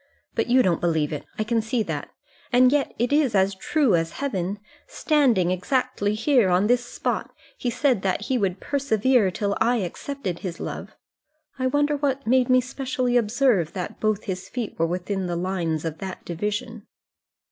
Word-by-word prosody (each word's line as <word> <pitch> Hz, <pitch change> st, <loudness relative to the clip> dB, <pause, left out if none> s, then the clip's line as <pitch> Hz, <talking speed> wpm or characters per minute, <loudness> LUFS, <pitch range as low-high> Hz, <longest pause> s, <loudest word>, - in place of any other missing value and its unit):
But 225 Hz, -, 0 dB
you 255 Hz, +1 st, +5 dB
don't 175 Hz, -3 st, +1 dB
believe 160 Hz, -3 st, +1 dB
it; 150 Hz, -, -5 dB
I 215 Hz, -, 0 dB
can 225 Hz, +1 st, +1 dB
see 225 Hz, +1 st, -1 dB
that. -, -, -4 dB, 0.4 s
And 250 Hz, 0 st, +5 dB
yet 290 Hz, -1 st, 0 dB
it 240 Hz, +4 st, 0 dB
is 285 Hz, -7 st, +3 dB
as 195 Hz, +1 st, +3 dB
true 285 Hz, +4 st, +1 dB
as 165 Hz, -1 st, +1 dB
heaven. 200 Hz, -8 st, -2 dB, 0.3 s
Standing 245 Hz, -, +2 dB
exactly 210 Hz, +2 st, 0 dB
here, 240 Hz, -3 st, +3 dB
on 180 Hz, +3 st, +3 dB
this 245 Hz, +2 st, +3 dB
spot, 245 Hz, -, -3 dB, 0.3 s
he 245 Hz, -, -2 dB
said 245 Hz, -3 st, +1 dB
that 190 Hz, +1 st, 0 dB
he 260 Hz, +5 st, -1 dB
would 195 Hz, -5 st, 0 dB
persevere 255 Hz, -5 st, +2 dB
till 200 Hz, +2 st, -1 dB
I 235 Hz, +2 st, +3 dB
accepted 205 Hz, -1 st, -4 dB
his 180 Hz, -3 st, -5 dB
love. -, -, -6 dB, 0.6 s
I 260 Hz, -, +1 dB
wonder 290 Hz, +2 st, +1 dB
what 275 Hz, -1 st, -1 dB
made 255 Hz, +2 st, +3 dB
me 255 Hz, 0 st, +5 dB
specially 255 Hz, -1 st, -2 dB
observe 225 Hz, -, +2 dB
that 180 Hz, -4 st, -5 dB
both 215 Hz, -1 st, 0 dB
his 185 Hz, -3 st, -5 dB
feet 240 Hz, -4 st, -4 dB
were 165 Hz, -, +3 dB
within 185 Hz, +2 st, -2 dB
the 175 Hz, -, -2 dB
lines 170 Hz, -3 st, -2 dB
of 160 Hz, -1 st, -4 dB
that 190 Hz, -1 st, -7 dB
division." 210 Hz, +5 st, -4 dB
215 Hz, 180 wpm, -24 LUFS, 185-255 Hz, 0.6 s, you